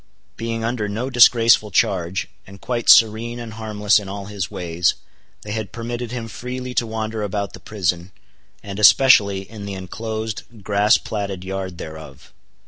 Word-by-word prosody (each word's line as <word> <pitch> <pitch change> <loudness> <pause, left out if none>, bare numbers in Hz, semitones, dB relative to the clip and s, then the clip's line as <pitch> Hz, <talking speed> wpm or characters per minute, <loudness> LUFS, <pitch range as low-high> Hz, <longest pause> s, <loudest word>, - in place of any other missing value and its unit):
Being 115 0 -4
under 115 -3 -2
no 115 +6 -3
disgraceful 115 -3 +5
charge, 90 -1 0 0.2
and 100 0 -13
quite 120 +2 -2
serene 115 +2 +5
and 115 -2 -7
harmless 105 -1 +1
in 100 -2 -9
all 100 0 -6
his 100 -2 -4
ways, 85 0 0 0.5
they 105 - -7
had 110 -1 -4
permitted 120 0 -5
him 120 -2 -5
freely 125 +2 -6
to 120 - 0
wander 110 0 -4
about 100 -1 -3
the - - -10
prison, 90 -3 -2 0.5
and 100 0 -7
especially 105 -4 +6
in 105 -2 -9
the 100 - -5
inclosed 110 +3 -6
grass 105 +2 +3
platted 100 -3 -5
yard 95 -1 -5
thereof. 80 -4 -10
105 Hz, 155 wpm, -21 LUFS, 100-115 Hz, 0.5 s, especially